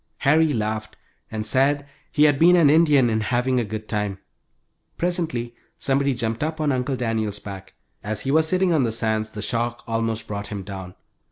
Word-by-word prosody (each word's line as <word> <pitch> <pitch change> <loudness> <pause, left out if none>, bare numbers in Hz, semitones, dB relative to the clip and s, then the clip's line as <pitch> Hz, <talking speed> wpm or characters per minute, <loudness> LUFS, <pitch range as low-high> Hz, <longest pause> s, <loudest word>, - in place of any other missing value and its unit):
Harry 155 +2 +3
laughed 110 -2 -3 0.3
and 110 -1 -4
said 140 +5 +2 0.3
he 150 - +3
had 145 -2 +4
been 175 +2 +7
an 160 -5 +5
Indian 150 -5 +5
in 110 -1 0
having 125 +3 +1
a - - +1
good 110 0 -6
time. 105 -3 -2 0.8
Presently 165 -10 -1 0.2
somebody 140 0 +1
jumped 115 +1 -2
up 155 +1 -3
on 150 -2 +1
Uncle 130 +1 -1
Daniel's 110 -4 -1
back. 95 -2 -9 0.3
As 105 +1 -3
he 135 - -2
was 160 +2 +3
sitting 185 0 +2
on 155 - +3
the 115 - 0
sands 110 -1 0
the 105 -1 -7
shock 120 +1 -2
almost 115 -1 -2
brought 100 -1 -5
him 100 -2 -5
down. 95 -2 -8
120 Hz, 185 wpm, -23 LUFS, 110-145 Hz, 0.8 s, been